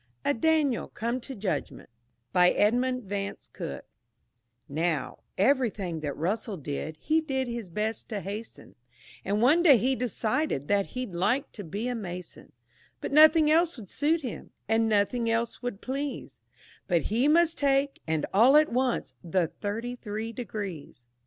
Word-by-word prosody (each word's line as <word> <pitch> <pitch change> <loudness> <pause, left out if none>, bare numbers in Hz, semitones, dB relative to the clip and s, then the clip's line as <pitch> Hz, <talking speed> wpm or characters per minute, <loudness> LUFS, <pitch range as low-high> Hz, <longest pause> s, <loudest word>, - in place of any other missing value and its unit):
A 285 - +3
DANIEL 295 -1 +1
COME 235 +3 -3
TO 265 +2 -8
JUDGMENT 200 -2 -3 0.5
BY 180 0 +6
EDMUND 250 +5 +1
VANCE 200 0 -5
COOKE 70 - -6 0.8
Now, 155 -1 -2 0.2
everything 205 - +1
that 145 -2 -4
Russell 200 +5 -2
did, 150 +1 -5
he 315 +1 +2
did 265 -4 -2
his 235 -5 -5
best 215 +5 -3
to 215 -3 -3
hasten, 205 +4 -7 0.5
And 205 +3 0
one 300 +8 +5
day 300 -7 +7
he 255 +5 +1
decided 235 - -1
that 200 -1 +2
he'd 250 -7 -4
like 205 +11 0
to 205 - -8
be 200 +8 -4
a 250 - -1
Mason; 180 -6 -7 0.5
But - - -5
nothing 310 +1 +7
else 330 -1 +3
would 205 -6 -10
suit 315 +4 +1
him, 250 -6 -6 0.2
and 225 0 +2
nothing 215 +3 +1
less 230 0 -1
would 245 -5 -4
please, 275 +2 -4 0.5
But 175 -3 +2
he 245 +5 +3
must 335 +2 +3
take, 275 0 +1
and 160 -1 0
all 245 +9 +7
at 305 0 +4
once, 250 - 0
the 170 -1 0
thirty 225 +4 -4
three 220 -1 -5
degrees. 195 - -6
225 Hz, 155 wpm, -28 LUFS, 195-265 Hz, 0.8 s, day